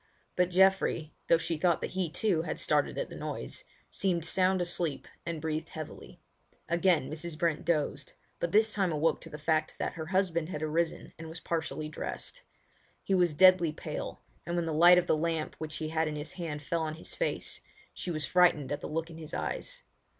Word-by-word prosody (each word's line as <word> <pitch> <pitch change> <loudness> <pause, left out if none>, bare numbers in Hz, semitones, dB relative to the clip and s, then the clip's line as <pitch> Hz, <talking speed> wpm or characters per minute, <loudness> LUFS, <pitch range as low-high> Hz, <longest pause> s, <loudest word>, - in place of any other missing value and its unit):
But 180 0 +3
Geoffrey—though 180 -4 +3
she 165 -1 -2
thought 170 +1 +3
that - - -3
he, 185 -3 -1
too, 185 -1 +1
had 165 - -4
started - - +1
at - - -2
the - - -9
noise—seemed 175 -4 -3
sound 185 +2 +2
asleep, 175 -4 -1 0.2
and 170 -2 -2
breathed 155 +1 -3
heavily. 155 -2 -8 0.5
Again 170 -4 +3
Mrs. 155 +1 -4
Brent 165 -2 0
dozed; 150 -4 0 0.3
but 170 - -1
this 215 +2 +4
time 190 -4 +1
awoke 155 +1 +1
to - - -8
the 150 - -7
fact 155 +1 0
that - - -2
her 160 -1 -6
husband 175 -3 +1
had 155 -4 -4
arisen 160 +2 -1
and 160 0 -7
was 165 +1 -7
partially 160 -2 -2
dressed. 330 - -5 0.6
He 195 - 0
was 175 -4 +3
deadly 185 -1 +6
pale, 155 -1 -6 0.2
and 175 +1 -3
when 170 -1 0
the 160 - -2
light 175 +3 +8
of 180 - +3
the - - +3
lamp 160 0 -1
which 155 -1 -5
he 155 -1 -3
had 160 0 +1
in 150 - -3
his 150 +1 -5
hand 155 -5 -5
fell 165 +2 -1
on 155 -1 -2
his 160 - -6
face, - - -2 0.3
she - - -5
was 155 -3 -1
frightened 175 -6 +4
at 145 0 -2
the - - -5
look 165 +2 -2
in 165 - -10
his 155 -1 -7
eyes. - - -4
165 Hz, 200 wpm, -30 LUFS, 155-180 Hz, 0.6 s, light